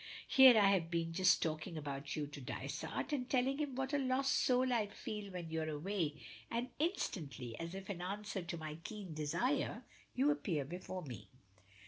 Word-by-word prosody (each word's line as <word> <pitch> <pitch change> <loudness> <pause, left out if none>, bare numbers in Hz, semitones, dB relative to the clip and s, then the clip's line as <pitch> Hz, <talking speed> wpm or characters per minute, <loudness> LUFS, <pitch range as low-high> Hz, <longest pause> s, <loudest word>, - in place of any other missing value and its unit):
Here 260 -3 +9
I 205 -2 +7
have 180 -4 +2
been 165 -1 -1
just 185 +2 +4
talking 160 +2 -3
about 140 -1 -4
you 150 - -1
to 145 0 -9
Dysart, 135 - -4
and 255 -3 -1
telling 265 +2 +2
him 290 -4 -2
what 265 +2 -2
a 290 - +3
lost 265 0 +2
soul 255 0 +3
I 220 -3 +2
feel 205 0 -6
when 175 -3 -6
you're 160 -1 -1
away, 155 -1 -2 0.3
and 240 +2 -2
instantly, 150 - -2
as 165 +2 -5
if 195 0 -7
in 185 -4 -4
answer 200 +2 -3
to 170 0 -5
my 155 0 -6
keen 205 -6 -6
desire, 170 - 0 0.3
you 275 +3 +4
appear 170 - -1
before 180 +3 -5
me." 115 -8 -8
185 Hz, 180 wpm, -37 LUFS, 155-250 Hz, 0.3 s, Here